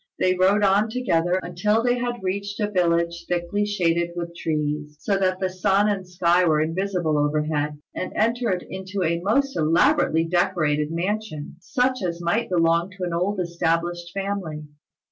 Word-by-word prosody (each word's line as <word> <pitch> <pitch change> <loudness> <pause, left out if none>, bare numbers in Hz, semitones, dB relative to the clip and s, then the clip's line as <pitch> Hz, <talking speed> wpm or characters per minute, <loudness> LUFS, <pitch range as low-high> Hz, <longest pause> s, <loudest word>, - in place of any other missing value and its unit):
They 185 - +2
rode 190 +3 +3
on 200 +2 +3
together 185 -7 +1
until 210 +6 0
they 245 0 +2
had 240 -3 -3
reached 200 +2 -3
a 210 -1 -1
village 170 -2 0
thickly 175 +4 -1
shaded 170 -4 0
with 170 -1 -5
trees, 150 -2 -2
so 200 - 0
that 185 -1 +1
the 190 - 0
sun 195 +2 +2
and 195 -3 -1
sky 175 0 +3
were 155 -3 +3
invisible 165 -1 0
overhead, 150 0 0 0.2
and 185 - -4
entered 225 -4 0
into 190 0 -4
a 170 0 0
most 270 +9 +1
elaborately 160 0 +3
decorated 155 -3 +1
mansion, 175 -3 -3
such 255 +7 0
as 170 -2 -2
might 175 +7 0
belong 170 0 +2
to 185 - -5
an 175 -1 -2
old 185 +4 0
established 170 0 -1
family. 195 -6 -4
180 Hz, 160 wpm, -23 LUFS, 165-200 Hz, 0.2 s, rode